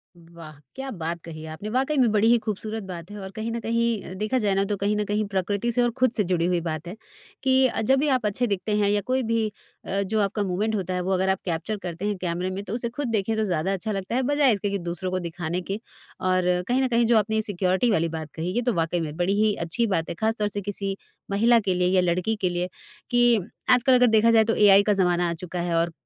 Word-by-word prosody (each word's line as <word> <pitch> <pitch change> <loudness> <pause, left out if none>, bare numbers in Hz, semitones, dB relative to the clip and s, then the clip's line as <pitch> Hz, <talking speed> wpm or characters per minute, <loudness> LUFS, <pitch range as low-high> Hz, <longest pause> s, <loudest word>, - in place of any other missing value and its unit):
वाह 165 -2 -13 0.2
क्या 270 0 -5
बात 170 -3 -4
कही 160 -1 -8
आपने! 160 +7 -7
वाक़ई 265 +6 0
में 245 -4 +4
बड़ी 215 +1 +3
ही 240 +1 +6
खूबसूरत 215 +1 -4
बात 175 -2 -8
है। 210 - -7
और 190 -1 -7
कहीं 220 +2 -4
न 235 - -3
कहीं 230 -1 0
अ, 185 - -8
देखा 215 +6 -1
जाए 205 -4 +1
ना 195 - +2
तो 205 +1 -1
कहीं 200 +2 0
न 210 - +1
कहीं 210 +1 0
प्रकृति 200 +4 -1
से 245 - +1
और 240 - +1
खुद 255 -2 +3
से 210 - +3
जुड़ी 175 -2 0
हुई 175 0 +1
बात 160 -1 -4
है। 180 - -6 0.5
कि 260 -1 +4
अ, - - -3
जब 265 +5 +3
भी 300 - +1
आप 255 -5 +1
अच्छे 210 +4 0
दिखते 205 +1 -1
हैं 205 -1 +2
या 205 0 +2
कोई 260 0 +2
भी 225 -1 0 0.3
अ, 195 +1 -1
जो 210 +3 -1
आपका 205 +1 0
मूमेंट 200 +4 -1
होता 185 -2 -2
है 180 - -1
वो 185 +2 -2
अगर 190 +1 +1
आप 190 0 +1
कैप्चर 180 +5 -2
करते 175 +2 -5
हैं 210 0 0
कैमरे 180 +1 -2
में 195 +2 -4
तो 200 - -6
उसे 235 0 -2
खुद 270 +3 -4
देखें 220 -1 0
तो 220 - 0
ज़्यादा 185 -1 0
अच्छा 205 +3 -3
लगता 195 +2 -3
है 260 - +2
बजाए 290 -3 +4
इसके 205 0 -2
कि 200 - -1
दूसरों 175 +2 -3
को 185 - 0
दिखाने 170 0 -4
के। 195 +3 -4 0.4
और 185 0 +1 0.2
कहीं 255 +2 +2
न - - +2
कहीं 235 -1 +2
जो 230 0 +4
आपने 220 +1 +1
सिक्योरिटी 190 +1 +1
वाली 165 -4 +2
बात 155 -2 -7
कही 165 +3 -3
ये 240 - +2
तो 245 -1 0
वाक़ई 165 0 0
में 155 -2 -4
बड़ी 180 +2 +1
ही 215 -1 +3
अच्छी 230 +8 0
बात 165 -5 -1
है - - -4
खासतौर 220 +2 0
से 205 0 -4
किसी 195 0 -3 0.4
महिला 230 +4 +4
के 195 -4 0
लिए 180 0 +1
या 185 - +5
लड़की 180 +5 0
के 185 - +2
लिए। 175 0 -2 0.4
कि 240 -2 +4 0.3
आजकल 250 +1 +5
अगर 250 0 +5
देखा 220 0 +4
जाए 225 -1 +6
तो 225 +1 0
एआई 200 -1 +6
का 210 - +2
ज़माना 180 -2 +2
आ - - -1
चुका 175 +1 -5
है 170 -1 -1
और 165 +1 +1
200 Hz, 265 wpm, -25 LUFS, 180-225 Hz, 0.5 s, ही